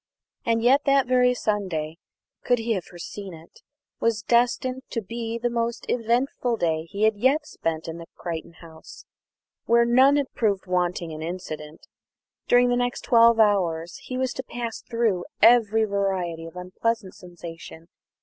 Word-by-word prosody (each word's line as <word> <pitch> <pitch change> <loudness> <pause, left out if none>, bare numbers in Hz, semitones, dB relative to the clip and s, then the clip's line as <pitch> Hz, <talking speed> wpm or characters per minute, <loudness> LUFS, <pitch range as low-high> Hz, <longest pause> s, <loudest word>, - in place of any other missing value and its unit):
And 230 0 +2
yet 265 +4 +4
that 275 -1 +4
very 250 0 +3
Sunday, 185 -8 -2 0.4
could 245 - +2
he 230 0 -3
have 185 -5 -3
foreseen 180 +2 -8
it, 160 +1 -17 0.4
was 225 -2 0
destined 250 +2 +1
to 230 - -2
be 230 +2 -5
the 235 +1 -1
most 235 0 -2
eventful 240 +1 0
day 160 -3 0
he 200 +5 -4
had 220 -1 +3
yet 270 +7 +2
spent 165 - -4
at 165 +1 -7
Crichton 170 -1 -6
House, 160 -2 -13 0.6
where 235 0 +4
none 260 +4 +5
had 285 -2 -1
proved 200 -5 0
wanting 180 -2 -1
in 155 0 -7
incident. 160 -3 -7 0.6
During 245 0 +5
the 245 - +2
next 245 0 -1
twelve 230 -1 +5
hours 175 -6 +2
he 255 - -6
was 260 -1 -1
to 260 - -5
pass 235 -2 -5
through 225 -7 -1
every 225 -2 +5
variety 190 -5 -2
of 165 - -13
unpleasant 190 +3 -3
sensation. 170 -2 -11
220 Hz, 155 wpm, -25 LUFS, 175-240 Hz, 0.6 s, none